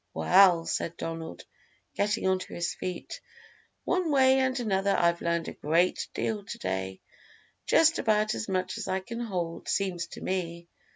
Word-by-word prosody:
"Well," 170 - +5
said 170 0 -2
Donald, 165 0 -6 0.5
getting 205 0 0
onto 185 0 -1
his 175 0 -2
feet, 185 - -6 0.6
"one 365 -2 0
way 265 -2 +5
and 260 0 +1
another 200 -3 +1
I've 170 0 +2
learned 170 -1 -1
a - - -5
great 170 +4 +1
deal 215 -2 -2
to - - -7
day 95 0 -3 0.7
just 325 0 +4
about 215 0 +2
as 220 - -4
much 185 -1 -1
as - - -5
I 190 0 -1
can 230 +5 -7
hold, 180 -8 -4
seems 185 -3 -1
to - - -9
me." 170 -2 -3
185 Hz, 160 wpm, -28 LUFS, 170-215 Hz, 0.7 s, Well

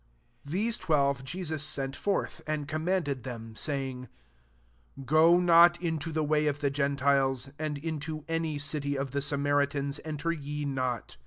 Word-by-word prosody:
5 145 - -9
These 215 +5 +1
twelve 140 -4 +1
Jesus 160 +1 -3
sent 135 -3 -1
forth, 200 -1 -2
and 155 -2 -2
commanded 155 -3 -1
them, 115 -3 -7
saying, 130 -2 -3 0.5
" - - -16
Go 160 +5 +5
not 175 0 +6
into 165 -2 -2
the 155 0 0
way 150 0 +2
of 145 -1 0
the 145 -2 0
gentiles, 135 -2 +1
and 155 -2 -2
m\,o 155 -1 -4
any 165 -2 -1
city 145 0 -1
of 135 -1 -3
the 140 +1 -1
Samaritans 140 0 0
enter 155 +1 -2
ye 150 -2 -4
not. 130 - -3
145 Hz, 155 wpm, -29 LUFS, 135-155 Hz, 0.5 s, not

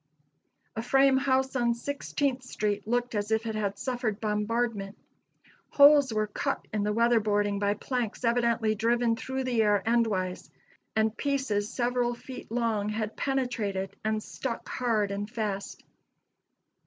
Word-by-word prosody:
A 225 - -2
frame 270 +2 +4
house 265 0 +1
on 240 -2 +2
Sixteenth 280 0 -2
street 210 -5 -2
looked 245 +1 0
as 205 -1 -1
if 220 +1 +1
it 220 - -2
had 200 -2 -2
suffered 240 -4 -2
bombardment. 210 -1 -1 0.7
Holes 285 -2 +7
were 215 -1 +1
cut 205 - -3
in 210 - 0
the 210 +1 0
weather 235 +2 +3
boarding 205 -1 0
by 205 0 +1
planks 245 0 -3
evidently 235 -2 +2
driven 230 +2 +1
through 265 +2 -4
the 245 -3 +1
air 205 -2 +3
endwise, 215 -6 0 0.5
and 220 0 +2
pieces 265 -8 -1
several 245 -1 0
feet 255 +2 -10
long 225 -3 0
had 215 0 -3
penetrated 215 -8 -2
and 215 0 -1
stuck 245 -4 -5
hard 220 -5 0
and 205 +1 -3
fast. 210 -4 -4
225 Hz, 140 wpm, -28 LUFS, 210-245 Hz, 0.7 s, Holes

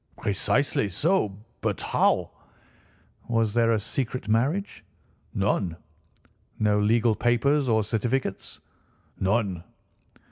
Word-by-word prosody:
"Precisely 105 +2 0
so. 110 - 0 0.2
But - - -1
how—" - - +1 1.0
"Was 115 -3 +1
there 115 -1 +3
a 110 - +1
secret 125 +2 -3
marriage?" 135 - 0 0.5
"None." 95 -3 0 0.8
"No 105 -1 +2
legal 115 +2 +3
papers 130 +5 +2
or 110 -1 +3
certificates?" 120 +5 -2 0.6
"None." 95 -3 0
115 Hz, 95 wpm, -26 LUFS, 105-125 Hz, 1.0 s, there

